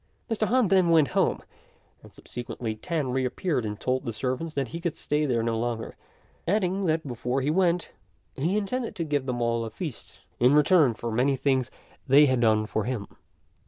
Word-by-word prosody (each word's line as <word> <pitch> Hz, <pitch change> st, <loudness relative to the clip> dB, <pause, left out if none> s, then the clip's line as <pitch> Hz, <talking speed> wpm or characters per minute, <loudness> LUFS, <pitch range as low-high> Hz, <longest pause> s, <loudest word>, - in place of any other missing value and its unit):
Mr. 215 Hz, -1 st, +1 dB
Han 245 Hz, -4 st, +3 dB
then 185 Hz, -3 st, +4 dB
went 160 Hz, -4 st, +5 dB
home, -, -, +1 dB, 0.6 s
and -, -, -15 dB
subsequently 120 Hz, -2 st, -6 dB
Tan 145 Hz, +3 st, -2 dB
reappeared 130 Hz, +3 st, -1 dB
and 105 Hz, 0 st, -5 dB
told 130 Hz, +1 st, -1 dB
the 120 Hz, -, -3 dB
servants 130 Hz, +8 st, -3 dB
that 135 Hz, -4 st, -1 dB
he 170 Hz, -, -6 dB
could 170 Hz, -2 st, -2 dB
stay 150 Hz, 0 st, 0 dB
there 120 Hz, -3 st, +1 dB
no 115 Hz, 0 st, 0 dB
longer, 115 Hz, 0 st, -3 dB, 0.5 s
adding 190 Hz, 0 st, +1 dB
that 160 Hz, -1 st, 0 dB
before 125 Hz, +2 st, -2 dB
he 145 Hz, +3 st, +1 dB
went 175 Hz, 0 st, +1 dB, 0.4 s
he 170 Hz, +9 st, 0 dB
intended 230 Hz, +4 st, -2 dB
to 170 Hz, -, -2 dB
give 145 Hz, -4 st, -1 dB
them 120 Hz, -1 st, -1 dB
all 115 Hz, 0 st, 0 dB
a 115 Hz, -, -4 dB
feast 140 Hz, +3 st, -7 dB, 0.2 s
in 125 Hz, +4 st, +5 dB
return 150 Hz, -, +5 dB
for 115 Hz, +1 st, -4 dB
many 130 Hz, +5 st, +2 dB
things 130 Hz, -2 st, +1 dB, 0.4 s
they 140 Hz, +3 st, +7 dB
had 130 Hz, -3 st, +2 dB
done 110 Hz, -2 st, +3 dB
for 110 Hz, 0 st, -2 dB
him. 120 Hz, -5 st, -3 dB
135 Hz, 190 wpm, -26 LUFS, 120-170 Hz, 0.6 s, they